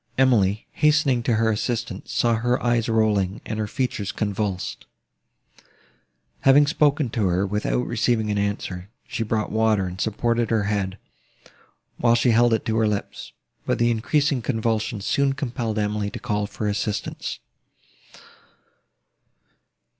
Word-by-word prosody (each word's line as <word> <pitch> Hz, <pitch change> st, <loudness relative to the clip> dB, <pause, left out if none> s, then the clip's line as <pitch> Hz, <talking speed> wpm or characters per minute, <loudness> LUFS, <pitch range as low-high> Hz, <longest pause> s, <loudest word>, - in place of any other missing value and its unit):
Emily, 110 Hz, -6 st, +3 dB
hastening 150 Hz, -5 st, +2 dB
to 115 Hz, 0 st, +1 dB
her 110 Hz, 0 st, +2 dB
assistance, 110 Hz, -2 st, -3 dB
saw 120 Hz, -1 st, +2 dB
her 120 Hz, +2 st, +1 dB
eyes 120 Hz, -1 st, +1 dB
rolling, 105 Hz, -3 st, +1 dB
and 110 Hz, 0 st, -4 dB
her 105 Hz, -, -1 dB
features 110 Hz, -4 st, -2 dB
convulsed. 100 Hz, -3 st, -3 dB, 1.5 s
Having 140 Hz, +2 st, +6 dB
spoken 150 Hz, -4 st, +2 dB
to 110 Hz, -5 st, 0 dB
her, 90 Hz, +2 st, +1 dB
without 105 Hz, +5 st, -1 dB
receiving 115 Hz, -2 st, 0 dB
an 105 Hz, -, 0 dB
answer, 100 Hz, -2 st, -3 dB, 0.2 s
she -, -, -4 dB
brought 110 Hz, -1 st, -1 dB
water, 110 Hz, -3 st, +2 dB
and 90 Hz, +1 st, -5 dB
supported 115 Hz, +2 st, 0 dB
her 110 Hz, -2 st, +1 dB
head, 100 Hz, -1 st, -1 dB, 1.0 s
while 120 Hz, -1 st, +3 dB
she 120 Hz, +1 st, +3 dB
held 120 Hz, +1 st, +4 dB
it 110 Hz, -, 0 dB
to 110 Hz, 0 st, 0 dB
her 110 Hz, -1 st, +3 dB
lips; 105 Hz, -1 st, -4 dB, 0.3 s
but -, -, 0 dB
the 120 Hz, 0 st, +3 dB
increasing 140 Hz, +4 st, +1 dB
convulsions 110 Hz, -3 st, -1 dB
soon 140 Hz, -1 st, +2 dB
compelled 120 Hz, -5 st, -3 dB
Emily 105 Hz, -1 st, -1 dB
to -, -, -7 dB
call 105 Hz, -4 st, -2 dB
for 105 Hz, +1 st, -4 dB
assistance. 105 Hz, 0 st, -3 dB
110 Hz, 140 wpm, -23 LUFS, 105-120 Hz, 1.5 s, Having